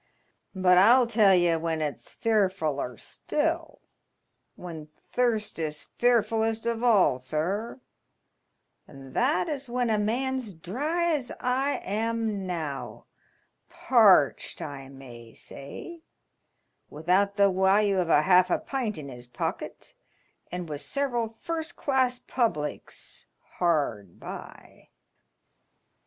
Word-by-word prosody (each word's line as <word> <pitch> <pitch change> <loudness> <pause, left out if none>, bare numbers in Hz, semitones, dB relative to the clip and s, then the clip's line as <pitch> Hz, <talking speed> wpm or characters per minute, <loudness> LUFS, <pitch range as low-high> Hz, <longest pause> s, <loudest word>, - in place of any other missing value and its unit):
But 180 -1 +5
I'll 240 +6 +6
tell 215 -4 +4
ye 175 -2 +3
when 160 0 -2
it's 150 -2 -4
fearfuUer 185 - 0
still - - -3 0.4
— - - -51 0.3
when 165 -4 -8
thirst 220 +6 -2
is 150 -2 -4
fearfullest 225 -2 +2
of 235 0 -1
all, 200 - +4
sir 175 - -3 0.5
— - - -50
and 135 -2 -13
that 180 +6 +1
is 275 -3 -5
when 245 -1 0
a 215 - +2
man's 245 0 -2
dry 305 - -1
as 275 -5 -2
I 265 +3 0
am 220 -1 -2
now, 155 -6 -5 0.6
parched, - - +4
I 135 -2 -7
may 120 -4 -12
say, 325 - -9 0.9
without 185 +6 +1
the 200 -1 +4
walue 190 +1 +3
of 175 - -2
half 180 +4 +5
a - - +2
pint 245 -8 -3
in 150 -2 -7
his 125 -2 -10
pocket, 125 - -5 0.6
and 180 -1 -4
with 150 -2 -5
several 240 -5 -2
first 330 +3 -4
class 260 -3 +1
publics 220 - -3 0.3
hard 140 - 0
by." - - -10
195 Hz, 115 wpm, -27 LUFS, 155-240 Hz, 0.9 s, I'll